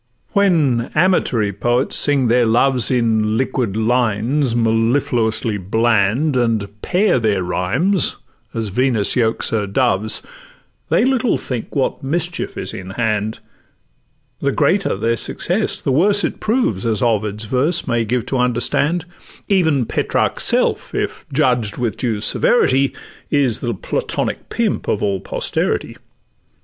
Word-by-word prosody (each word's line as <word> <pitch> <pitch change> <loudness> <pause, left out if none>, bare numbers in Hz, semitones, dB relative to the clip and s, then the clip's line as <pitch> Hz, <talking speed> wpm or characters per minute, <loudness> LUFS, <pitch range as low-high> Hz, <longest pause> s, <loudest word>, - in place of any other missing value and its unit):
When 155 -12 +2
amatory 140 - +2
poets 120 +6 0
sing 140 -4 +3
their 120 0 +3
loves 125 +2 +3
In 110 -3 +1
liquid 125 -5 -1
lines 120 +3 +1
mellifluously 115 -1 +1
bland, 110 - +1
And 115 -4 +1
pair 190 -6 +2
their 105 -5 0
rhymes 115 - +1 0.4
as 110 -2 -3
Venus 120 -1 +1
yokes 115 -2 0
her 105 -2 -1
doves, 110 -1 0 0.7
They - - +3
little 260 -2 +1
think 125 -3 -6
what 135 - -1
mischief 165 +5 -2
is - - -5
in 95 0 -8
hand; 110 -2 -1 1.0
The - - 0
greater - - +1
their 115 +4 0
success - - -1
the - - -2
worse 200 +9 +3
it - - -2
proves, 215 - 0
As 110 -2 0
Ovid's 110 -2 -1
verse 145 +9 +1
may 120 -1 +1
give 120 +2 -1
to 135 - -2
understand; 125 +8 +1 0.4
Even 160 - +2
Petrarch's - - -1
self, - - 0
if - - -3
judged 125 -7 +1
with 120 -5 -2
due 110 -5 -2
severity, 140 - +2 0.4
Is 135 -6 +1
the 120 -3 -3
Platonic - - -3
pimp - - -1
of - - -1
all 100 -2 0
posterity. - - -2
120 Hz, 130 wpm, -18 LUFS, 110-140 Hz, 1.0 s, sing